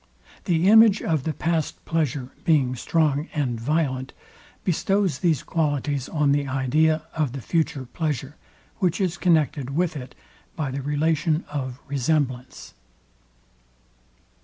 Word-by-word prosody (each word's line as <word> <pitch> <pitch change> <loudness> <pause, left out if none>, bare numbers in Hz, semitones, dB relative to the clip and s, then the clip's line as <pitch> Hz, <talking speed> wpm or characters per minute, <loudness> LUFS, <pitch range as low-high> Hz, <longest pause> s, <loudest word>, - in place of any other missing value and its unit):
The 175 -1 +2
image 220 -1 +7
of 155 -5 0
the 160 - 0
past 165 -1 -2
pleasure 145 -5 -1
being 135 -6 +2
strong 150 +2 +1
and 125 -6 -1
violent, 130 -1 -1 0.5
bestows 195 -3 +1
these 165 -5 +1
qualities 145 -4 -1
on 150 -3 +2
the 140 0 +1
idea 150 +4 +2
of 150 -6 -1
the 140 - -5
future 160 -2 -1
pleasure, 145 0 -3 0.4
which 185 -1 +1
is 185 -3 0
connected 150 -6 +1
with 170 -1 +1
it 130 -3 -8 0.4
by 150 -5 -2
the 140 +1 -3
relation 155 +3 0
of 130 -3 -4
resemblance. 135 -2 -2
150 Hz, 125 wpm, -24 LUFS, 135-165 Hz, 0.5 s, image